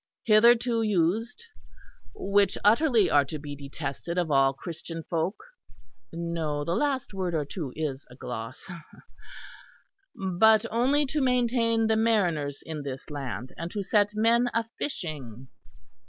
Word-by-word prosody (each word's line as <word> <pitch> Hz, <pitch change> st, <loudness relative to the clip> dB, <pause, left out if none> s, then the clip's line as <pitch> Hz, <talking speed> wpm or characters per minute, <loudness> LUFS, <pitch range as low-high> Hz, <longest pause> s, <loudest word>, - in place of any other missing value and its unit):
hitherto 230 Hz, +1 st, +4 dB
used, 215 Hz, -, 0 dB, 0.7 s
which 200 Hz, -, +2 dB
utterly 230 Hz, 0 st, +4 dB
are 145 Hz, -, +4 dB
to 145 Hz, +3 st, -6 dB
be 145 Hz, -1 st, -7 dB
detested 145 Hz, +4 st, -5 dB
of 175 Hz, -3 st, 0 dB
all 135 Hz, -1 st, +4 dB
Christian 165 Hz, +3 st, -7 dB
folk'; 170 Hz, +5 st, -2 dB, 0.7 s
(no, 165 Hz, -3 st, -3 dB
the 170 Hz, -, -1 dB
last 280 Hz, -2 st, -1 dB
word 185 Hz, -3 st, -2 dB
or 150 Hz, -2 st, 0 dB
two 145 Hz, -2 st, -5 dB
is 145 Hz, -3 st, -4 dB
a 125 Hz, -, -13 dB
gloss), 120 Hz, -1 st, -7 dB, 1.5 s
'but 210 Hz, +4 st, +3 dB
only 265 Hz, +6 st, +2 dB
to 295 Hz, +2 st, -2 dB
maintain 240 Hz, -3 st, +2 dB
the 220 Hz, 0 st, +2 dB
mariners 175 Hz, -11 st, +1 dB
in 155 Hz, -2 st, -5 dB
this 135 Hz, +1 st, -7 dB
land, 130 Hz, -3 st, -5 dB
and 165 Hz, +1 st, -4 dB
to 205 Hz, +2 st, -4 dB
set 205 Hz, +1 st, +2 dB
men 235 Hz, +3 st, +3 dB
a 230 Hz, -, +2 dB, 0.2 s
fishing.' 135 Hz, -, -5 dB
180 Hz, 135 wpm, -27 LUFS, 145-230 Hz, 1.5 s, hitherto